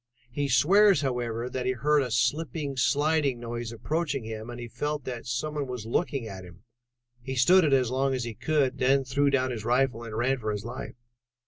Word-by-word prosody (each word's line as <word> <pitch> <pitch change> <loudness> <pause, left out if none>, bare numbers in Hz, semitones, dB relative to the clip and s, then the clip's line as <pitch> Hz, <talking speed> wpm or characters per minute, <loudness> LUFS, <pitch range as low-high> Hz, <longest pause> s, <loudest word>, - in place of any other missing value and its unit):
He 140 +2 -2
swears, 190 +11 +5
however, 120 -3 -2
that 125 0 -3
he 130 - +2
heard 145 +5 +2
a 130 - -2
slipping, 140 +4 -1
sliding 145 -1 +1
noise 120 -1 -5
approaching 145 +2 -2
him, 110 +1 -6
and 120 0 -7
he 120 - -6
felt 145 +4 -3
that 120 -1 -6
some 125 +6 -2
one 145 -2 -3
was 125 -4 -6
looking 135 +1 -1
at 95 -3 -8
him. 85 -2 -14 0.6
He 130 +2 -5
stood 180 +9 +5
it 150 - +2
as 130 -3 +3
long 135 +1 +1
as 125 - -2
he 115 -1 -5
could 145 +2 +1
and - - -16
then 135 +1 +3
threw 140 +2 +1
down 130 -2 +1
his 110 -3 -5
rifle 125 0 +1
and 110 -2 -6
ran 130 +3 +1
for 110 -2 -2
his 105 0 -4
life." 120 - -7
130 Hz, 215 wpm, -27 LUFS, 120-145 Hz, 0.6 s, swears